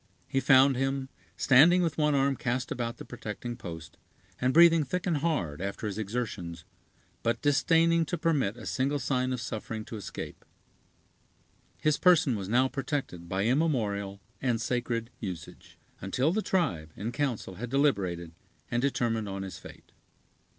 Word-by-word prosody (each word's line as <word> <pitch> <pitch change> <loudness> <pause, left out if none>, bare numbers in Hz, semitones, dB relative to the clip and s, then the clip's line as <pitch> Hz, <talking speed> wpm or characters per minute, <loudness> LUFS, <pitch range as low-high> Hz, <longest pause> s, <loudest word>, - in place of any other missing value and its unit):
He 135 - 0
found 135 0 +6
him, 135 0 -1 0.3
standing 165 +8 +6
with 165 -3 0
one 150 -1 +3
arm 135 0 +2
cast 125 0 -2
about 120 -1 -3
the - - -9
protecting 120 0 -6
post, 80 -5 -9 0.4
and 125 +1 +2
breathing 165 +1 +7
thick 175 +6 -3
and 170 -4 +1
hard, 115 - -1
after 100 +3 -4
his 105 0 -3
exertions, 95 -6 -4 0.6
but 115 - 0
disdaining 165 +3 +3
to 175 - -2
permit 145 -10 +1
a 120 - -9
single 140 +3 0
sign 130 -1 0
of 125 - -2
suffering 110 -1 -5
to 110 - -7
escape. 105 - -7 1.3
His 155 -1 +1
person 160 -8 +5
was 100 -2 -5
now 125 +4 +4
protected 130 - -4
by 95 +2 0
immemorial 110 -8 0 0.2
and 125 -4 +1
sacred 120 0 -2
usage, 90 -6 -8 0.2
until 125 - +1
the 215 - +1
tribe 110 - -1
in 110 +3 -4
council 120 -10 -2
had 120 - -4
deliberated 100 - +1 0.4
and 120 - +1
determined 115 -6 0
on 95 0 -4
his 95 -4 -7
fate. - - -14
125 Hz, 155 wpm, -29 LUFS, 100-145 Hz, 1.3 s, breathing